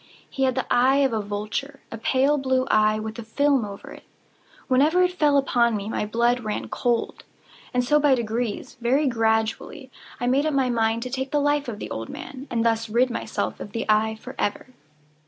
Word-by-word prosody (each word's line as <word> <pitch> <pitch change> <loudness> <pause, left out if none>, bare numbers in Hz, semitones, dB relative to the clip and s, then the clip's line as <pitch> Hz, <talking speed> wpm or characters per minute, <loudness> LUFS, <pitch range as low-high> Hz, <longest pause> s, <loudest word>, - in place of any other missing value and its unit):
He 270 - -1
had 260 -1 +1
the 260 - -1
eye 255 +2 +4
of 260 - 0
a 220 - 0
vulture—a 215 +6 -5
pale 275 +5 +2
blue 260 -1 +1
eye, 215 0 +3
with 220 +1 -6
a - - -5
film 275 +3 +1
over 200 -1 -8
it. - - -12 0.6
Whenever 300 +8 +4
it 360 - +2
fell 300 -5 +2
upon 240 -4 +2
me, 205 +1 -5
my 210 - -2
blood 235 +3 +2
ran 215 -3 -4
cold; 240 -2 -1 0.5
and 250 -1 +1
so 295 +4 +3
by 290 -2 +4
degrees—very 240 +3 -1
gradually—I 225 +2 -2
made 270 +5 +2
up 305 - -1
my 260 -2 +2
mind 225 0 +1
to 255 - -6
take 265 +1 -3
the 295 - +1
life 290 0 +1
of 225 -4 -5
the - - -7
old 115 0 -5
man, 270 +1 -8
and 230 -1 0
thus 225 -1 +1
rid 245 +3 +2
myself 110 - -3
of 205 - -8
the 230 - -2
eye 215 +1 +2
forever. 215 +2 -4
245 Hz, 190 wpm, -24 LUFS, 220-270 Hz, 0.6 s, eye